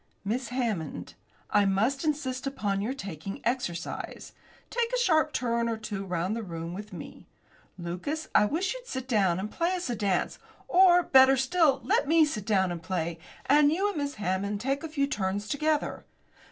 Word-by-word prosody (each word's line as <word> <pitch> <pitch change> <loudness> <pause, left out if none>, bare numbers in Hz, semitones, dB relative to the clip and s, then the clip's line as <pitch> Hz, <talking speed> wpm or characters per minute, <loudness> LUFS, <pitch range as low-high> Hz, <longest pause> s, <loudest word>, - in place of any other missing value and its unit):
"Miss 235 +4 -1
Hammond, 220 - -3 0.4
I 205 - +5
must 220 - +1
insist 275 -4 -1
upon 205 -7 -1
your 245 +6 -2
taking 195 - -6
exercise. 230 -8 -3 0.4
Take 470 0 0
a - - +1
sharp 315 -9 +3
turn 235 -3 0
or 225 - -1
two 210 -3 -5
round 180 +3 -1
the 230 - -3
room 165 -4 -6
with 205 +3 -7
me. - - -10 0.5
Lucas, 185 - -4
I 210 - +6
wish 340 - 0
you'd - - -10
sit 260 - -5
down 195 -8 +2
and 210 +3 -4
play 345 +2 0
us 355 -8 -3
a - - -1
dance. 195 -4 -1 0.3
Or, 355 -1 +6
better 265 -1 +6
still, 280 +2 +3
let - - +2
me 320 +1 +5
sit 215 -9 -4
down 190 -4 +2
and 170 -1 -5
play, 170 -1 -3 0.3
and 290 +1 +5
you 385 +6 +1
and 400 - -5
Miss 285 -1 -2
Hammond 200 +1 -1
take 275 +6 -1
a 325 - -4
few 285 -2 +1
turns 205 -6 -2
together. 305 +2 -1
240 Hz, 180 wpm, -28 LUFS, 195-295 Hz, 0.5 s, I